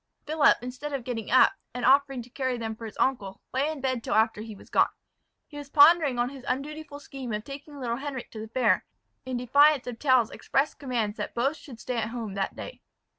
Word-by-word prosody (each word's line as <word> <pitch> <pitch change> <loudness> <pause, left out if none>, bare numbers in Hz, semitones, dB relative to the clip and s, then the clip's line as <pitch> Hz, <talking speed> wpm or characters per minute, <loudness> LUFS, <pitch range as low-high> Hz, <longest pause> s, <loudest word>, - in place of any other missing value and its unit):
Philip 300 0 +4
instead 255 +4 -6
of 270 -3 -3
getting 230 -3 -4
up, 255 - +6 0.2
and 245 - -2
offering 270 -1 +4
to 240 - -16
carry 260 -2 -1
them 225 -1 -4
for 225 - -9
his 215 - -11
uncle, 210 -8 -1
lay 275 +4 +1
in 305 -3 -7
bed 255 -3 -1
till - - -1
after 220 -1 +2
he 220 -1 -8
was - - -16
gone. - - +4 0.6
He 290 - -12
was 285 -1 -9
pondering 290 -2 +6
on 240 +1 +1
his 270 -2 -11
undutiful 290 +2 -4
scheme 270 -4 -7
of 210 0 -3
taking 280 +2 -9
little 235 -2 -2
Henric 270 -2 -6
to 220 - -8
the 220 - -6
fair, 225 -4 +1 0.4
in 255 -1 -2
defiance 280 +3 +4
of 240 -2 -6
Tell's 255 -5 +3
express 275 +3 0
commands 235 -6 -2
that - - -5
both 270 +6 +1
should 250 -7 -12
stay 250 -1 -4
at 220 -1 -1
home 230 -4 -5
that 195 0 -2
day. - - -8
255 Hz, 225 wpm, -27 LUFS, 230-280 Hz, 0.6 s, up